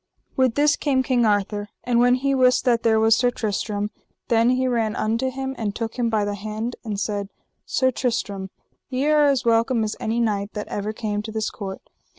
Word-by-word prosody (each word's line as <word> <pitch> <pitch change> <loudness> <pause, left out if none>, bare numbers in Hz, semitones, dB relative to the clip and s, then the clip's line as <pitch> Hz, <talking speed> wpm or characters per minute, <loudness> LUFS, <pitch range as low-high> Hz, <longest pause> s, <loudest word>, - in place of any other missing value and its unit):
With 260 -3 +2
this 290 0 +4
came 265 -3 +1
King 245 -3 +2
Arthur, 205 0 0
and 240 -1 +2
when 245 +1 +5
he 275 +2 0
wist 255 -1 +3
that 235 -2 +3
there 220 -1 +3
was 220 0 +5
Sir 245 +1 +2
Tristram, 210 -2 -2 0.4
then 230 0 +4
he 255 +1 +2
ran 230 -3 0
unto 230 +4 0
him 265 +1 -4
and 210 -2 -2
took 230 +1 -4
him 235 -1 +1
by 215 -2 +1
the 205 - -2
hand 215 +4 -4
and 210 -3 -3
said: 205 -1 -2 0.4
Sir 260 -1 +2
Tristram, 205 -6 -2 0.4
ye 260 +1 -1
are 300 -1 +4
as 270 -3 +1
welcome 230 +1 +2
as 215 0 -2
any 225 +2 -1
knight 210 -3 -1
that 210 -1 -5
ever 205 +1 -3
came 210 -2 -3
to 220 +1 -7
this 220 0 -2
court. 195 -2 -7
225 Hz, 205 wpm, -23 LUFS, 210-255 Hz, 0.4 s, when